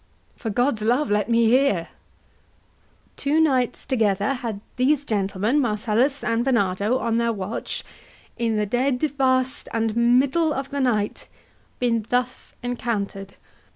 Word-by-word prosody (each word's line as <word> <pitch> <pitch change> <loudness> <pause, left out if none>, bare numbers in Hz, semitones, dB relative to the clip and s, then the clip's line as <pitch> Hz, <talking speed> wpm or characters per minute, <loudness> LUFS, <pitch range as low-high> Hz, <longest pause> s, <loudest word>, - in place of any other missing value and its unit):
HAMLET. - - -27
For 225 - -2
God's 245 +1 +1
love 245 +5 +1
let 210 +1 +1
me 230 0 +4
hear. 255 +2 +4
HORATIO. 170 -3 -4 1.3
Two 290 +3 +1
nights 260 -6 +1
together 210 -2 +1
had 230 -5 -4 0.2
these 280 +3 +2
gentlemen, 210 +3 0
Marcellus 240 +3 0
and 230 +1 +1
Barnardo, 210 -2 +1
on 230 -2 0
their 235 0 +1
watch 205 0 -4 0.5
In 230 -2 -1
the 210 0 +1
dead 250 +5 0 0.2
waste 260 -1 +1
and 225 -1 -1
middle 260 +7 +3
of 270 0 -4
the 280 - -2
night, 215 -5 0 0.5
Been 230 -3 0
thus 250 +1 -2
encounter'd. 205 -5 -3
235 Hz, 140 wpm, -23 LUFS, 215-260 Hz, 1.3 s, me